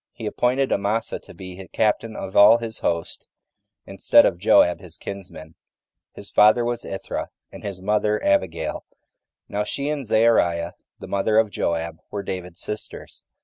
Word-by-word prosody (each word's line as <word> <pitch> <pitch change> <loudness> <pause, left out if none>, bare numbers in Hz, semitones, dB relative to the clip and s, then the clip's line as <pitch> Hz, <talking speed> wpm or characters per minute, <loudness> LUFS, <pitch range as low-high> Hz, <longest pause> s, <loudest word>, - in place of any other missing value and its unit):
He - - -8
appointed 130 +2 0
Amasa 105 +3 -1
to - - -14
be 95 +1 -9
captain 110 +1 0
of 95 - -7
all 105 +3 +8
his 115 -2 -5
host, 85 -1 -3 0.6
instead - - +4
of 85 - 0
Joab 90 -2 +4
his 85 -3 -11
kinsman: 90 -5 -9 0.6
his 100 - -9
father 110 +3 +5
was 120 0 -2
Ithra 95 - -5 0.2
and - - -11
his 95 -3 -7
mother 105 +1 +1
Abigail: 85 -5 0 0.6
now 105 +1 -2
she 140 +7 -3
and 150 -2 -2
Zeruiah, 90 -7 +2 0.2
the - - -10
mother 100 +2 +1
of 110 -2 +3
Joab, 85 -2 -2
were 100 -1 -5
David's 90 -3 -6
sisters. 105 -2 -7
100 Hz, 150 wpm, -23 LUFS, 90-110 Hz, 0.6 s, all